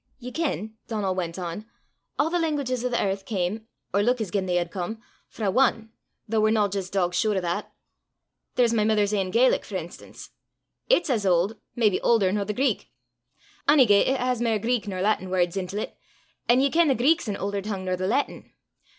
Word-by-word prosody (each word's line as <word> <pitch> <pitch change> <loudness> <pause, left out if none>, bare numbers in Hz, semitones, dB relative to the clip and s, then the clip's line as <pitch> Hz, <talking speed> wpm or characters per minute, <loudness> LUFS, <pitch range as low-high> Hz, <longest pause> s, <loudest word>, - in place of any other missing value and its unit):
"Ye 250 -1 -8
ken," 260 -8 -2
Donal 205 -4 -1
went 175 -2 -3
on, 180 +4 -5 0.5
"a' 290 - +2
the 350 +2 0
languages 280 -7 -1
o' 250 - 0
the 245 - 0
earth 195 0 -1
cam, 210 +2 -3 0.3
or 200 - +3
luik 245 +4 +2
as 210 -6 -3
gien 190 -1 -1
they 180 - 0
had 175 -1 0
come, 200 +4 -4 0.3
frae 220 - -6
ane, 225 -4 +2 0.4
though 220 0 +1
we're 215 - +4
no 215 -2 +3
jist 195 -1 -4
dogsure 190 +2 +1
o' - - +3
that. 175 -1 -3 0.8
There's 240 -2 +3
my 215 -2 +2
mither's 210 -1 +2
ain 195 -3 0
Gaelic, 240 +6 +3
for - - -8
enstance: - - -8 0.6
it's 350 - +3
as 225 -5 +1
auld, 190 +3 +1 0.2
maybe 215 -5 +2
aulder 210 -6 +3
nor 205 0 -1
the 210 - -2
Greek; 270 +4 0 0.8
onygait, 250 -9 +6
it 265 0 +1
has 250 -1 0
mair 230 -2 +2
Greek 230 +1 -1
nor 185 -2 -3
Laitin 205 -3 +1
words 180 -1 +1
intil 195 +2 -2
't, - - -19 0.6
an' 245 +2 +5
ye 275 0 +2
ken 335 0 +4
the 270 - +3
Greek's 285 +4 +2
an 205 - -2
aulder 200 0 -2
tongue 195 -2 -4
nor 185 0 0
the 185 +1 -2
Laitin. 260 +8 -1
215 Hz, 200 wpm, -25 LUFS, 190-245 Hz, 0.8 s, onygait